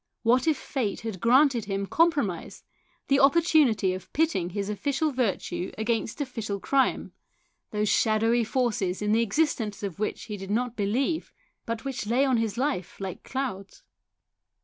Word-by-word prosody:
What 250 +5 +3
if 310 -3 +3
fate 240 -9 -3
had 220 -5 -5
granted 250 - +4
him 195 0 -2
compromise, 285 - 0 0.4
the 275 0 +3
opportunity 275 - +4
of 185 - -8
pitting 295 - +1
his 200 +1 -3
official 280 +8 -1
virtue 230 -7 -2
against 225 +3 -1
official 225 -7 -3
crime, 270 +6 +1 0.6
those 210 0 -1
shadowy 225 +2 +3
forces 215 -6 -1
in 210 - +1
the 225 +2 +4
existence 230 -4 0
of 195 -2 -4
which 215 - -2
he 210 -2 -6
did 195 0 -8
not 240 +3 -1
believe, 250 +10 -1 0.4
but 230 +1 -4
which 265 -5 -4
lay 250 +5 +3
on 260 -3 +2
his 225 -1 -1
life 255 - -2
like 190 -3 -5
clouds 250 -8 -5
230 Hz, 150 wpm, -27 LUFS, 205-270 Hz, 0.6 s, granted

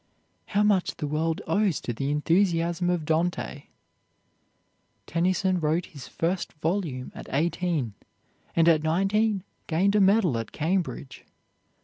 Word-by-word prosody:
How 205 +1 +2
much 205 -3 +2
the 150 - -4
world 155 +2 -1
owes 190 0 +1
to 120 - -3
the 135 +5 -2
enthusiasm 170 +3 +1
of 175 -3 0
Dante! 160 -3 -1 1.4
Tennyson 185 +2 +1
wrote 160 +2 0
his 140 -5 -11
first 175 +2 -2
volume 155 -5 -2
at - - -10
eighteen, 155 - 0 0.6
and 165 0 +4
at 160 -2 +5
nineteen 195 +5 +1 0.2
gained 185 +5 +2
a 210 - +5
medal 190 - +4
at 115 - -6
Cambridge. 160 -4 -2
170 Hz, 125 wpm, -26 LUFS, 155-190 Hz, 1.4 s, at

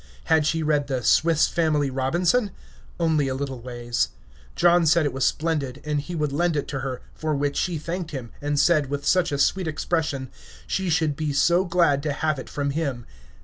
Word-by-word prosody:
Had 160 -2 +2
she 160 0 0
read 150 -2 +1
the 130 -3 -2
"Swiss 160 +3 +4
Family 155 -5 +1
Robinson"? 170 - +1 0.5
Only 160 -4 +2
a 130 - -2
little 135 -2 -4
ways. 120 -1 -2 0.5
John 175 -1 +4
said 155 +1 +4
it 145 - -1
was 135 0 -1
splendid, 150 -5 -1
and 150 -1 0
he 175 +4 -7
would 150 -3 -1
lend 170 +2 +1
it 145 - -2
to 135 - -3
her, 130 -1 -5
for 155 -1 -2
which 145 0 -1
she 175 -3 -1
thanked 170 +2 -4
him, 130 -6 -7
and 145 0 0
said, 150 -3 +3
with 145 0 -3
such 180 +1 +2
a 140 - -1
sweet 180 +5 +1
expression, 155 -4 -2 0.3
she 190 -2 -1
should 160 -3 +1
be 155 0 -2
so 170 +6 +3
glad 170 -6 +2
to 150 -1 -2
have 155 -1 -1
it - - -8
from 140 -1 -2
him. 140 -6 -3
150 Hz, 200 wpm, -24 LUFS, 140-165 Hz, 0.5 s, Swiss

